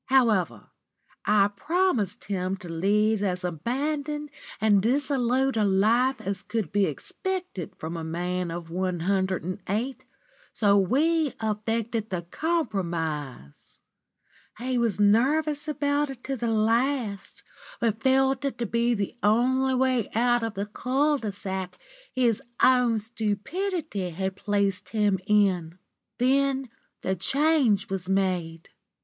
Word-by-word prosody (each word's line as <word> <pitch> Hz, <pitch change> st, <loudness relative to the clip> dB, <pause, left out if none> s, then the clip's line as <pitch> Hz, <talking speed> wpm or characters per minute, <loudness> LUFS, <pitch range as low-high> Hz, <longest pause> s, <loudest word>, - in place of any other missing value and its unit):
However, 215 Hz, -, +2 dB, 0.5 s
I 205 Hz, -1 st, +4 dB
promised 265 Hz, -, 0 dB
him 190 Hz, -1 st, -2 dB
to 180 Hz, -, -10 dB
lead 205 Hz, +5 st, +2 dB
as 180 Hz, -2 st, -1 dB
abandoned 285 Hz, -, -2 dB, 0.3 s
and 210 Hz, -2 st, +4 dB
dissolute 265 Hz, +1 st, +1 dB
a 220 Hz, -, +2 dB
life 220 Hz, +7 st, +3 dB
as 195 Hz, 0 st, -3 dB
could 210 Hz, -6 st, -3 dB
be 200 Hz, 0 st, +3 dB
expected 370 Hz, -, -4 dB
from 160 Hz, +2 st, -5 dB
a 165 Hz, -, -4 dB
man 175 Hz, +2 st, -2 dB
of 165 Hz, 0 st, -6 dB
one 180 Hz, -1 st, -1 dB
hundred 190 Hz, 0 st, 0 dB
and 185 Hz, +2 st, -4 dB
eight, 235 Hz, +7 st, -2 dB, 0.5 s
so 205 Hz, -2 st, +3 dB
we 290 Hz, -, +2 dB
effected 220 Hz, +1 st, -2 dB
the 180 Hz, -2 st, -3 dB
compromise. 170 Hz, -, -3 dB, 0.8 s
He 255 Hz, +3 st, -2 dB
was 230 Hz, -4 st, 0 dB
nervous 285 Hz, +9 st, +3 dB
about 290 Hz, -1 st, 0 dB
it 265 Hz, -2 st, -9 dB
to 270 Hz, -, -2 dB
the 235 Hz, -2 st, -2 dB
last, 225 Hz, -1 st, 0 dB, 0.4 s
but 225 Hz, -1 st, 0 dB
felt 265 Hz, +1 st, +3 dB
it 275 Hz, -, -2 dB
to 235 Hz, -, -2 dB
be 235 Hz, +2 st, +1 dB
the 200 Hz, +2 st, -3 dB
only 260 Hz, +5 st, +3 dB
way 255 Hz, -4 st, +1 dB
out 240 Hz, +1 st, +3 dB
of 225 Hz, -2 st, -3 dB
the 200 Hz, +1 st, -2 dB
cul 275 Hz, +7 st, 0 dB
de 215 Hz, -4 st, -3 dB
sac 190 Hz, -1 st, -5 dB, 0.3 s
his 240 Hz, -4 st, +1 dB, 0.2 s
own 250 Hz, -3 st, +5 dB
stupidity 220 Hz, -, -2 dB
had 190 Hz, +3 st, -3 dB
placed 200 Hz, -1 st, -1 dB
him 210 Hz, -3 st, +1 dB
in. 185 Hz, -5 st, +2 dB, 0.4 s
Then 270 Hz, +1 st, +2 dB, 0.3 s
the 190 Hz, -, 0 dB
change 265 Hz, -, +2 dB
was 190 Hz, -1 st, -3 dB
made. 180 Hz, -4 st, -1 dB
215 Hz, 130 wpm, -26 LUFS, 190-265 Hz, 0.8 s, own